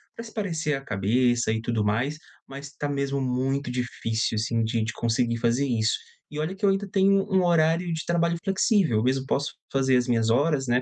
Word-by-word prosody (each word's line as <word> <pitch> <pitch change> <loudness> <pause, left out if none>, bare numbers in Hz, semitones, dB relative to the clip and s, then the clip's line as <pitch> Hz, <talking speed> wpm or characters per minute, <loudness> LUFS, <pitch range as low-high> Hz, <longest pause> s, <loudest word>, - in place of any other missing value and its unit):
pra 230 - -7
espairecer 170 -9 -2
a - - -8
cabeça 120 +2 +1
e 110 0 -1
tudo 115 -2 -1
mais, 120 +9 0 0.3
mas 140 +1 -9
tá 145 0 -4
mesmo 140 -1 -1
muito 130 +1 -1
difícil 120 -2 -2
assim 115 +1 0
de 115 0 0
de 110 -1 -3
conseguir 115 0 0
fazer 120 +4 +1
isso. 115 -3 +1 0.4
E 150 - -5
olha 160 +5 -2
que 200 +2 -2
eu - - +5
ainda 195 +1 0
tenho 195 +1 +3
um 190 -1 +3
horário 170 +1 +2
de 160 - -4
trabalho 170 0 +1
flexível, 195 - +2
eu 110 - +1
mesmo 130 +1 +1
posso 140 +1 -1 0.2
fazer 130 -1 +2
as 125 +1 0
minhas 115 -2 +1
horas, 140 +2 +2
né, 125 +1 +2
135 Hz, 205 wpm, -25 LUFS, 115-165 Hz, 0.4 s, eu